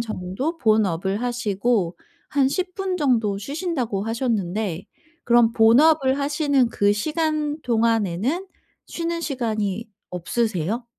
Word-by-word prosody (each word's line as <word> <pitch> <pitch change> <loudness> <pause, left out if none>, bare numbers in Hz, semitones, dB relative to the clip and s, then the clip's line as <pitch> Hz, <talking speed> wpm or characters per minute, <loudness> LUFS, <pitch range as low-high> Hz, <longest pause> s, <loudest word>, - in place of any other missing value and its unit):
정도 230 - -4
본업을 205 - +1
하시고 225 -5 0 0.3
한 275 -2 +3
10 365 +4 -3
분 380 -2 -2
정도 230 - +1
쉬신다고 265 - -3
하셨는데 215 -6 -2 0.4
그럼 235 -1 +4
본업을 265 +4 +4
하시는 285 -3 +1
그 205 -2 +2
시간 305 +4 -1
동안에는 230 - 0 0.4
쉬는 335 0 -3
시간이 220 - -2 0.2
없으세요? 210 +3 -2
235 Hz, 240 characters per minute, -23 LUFS, 205-290 Hz, 0.4 s, 그럼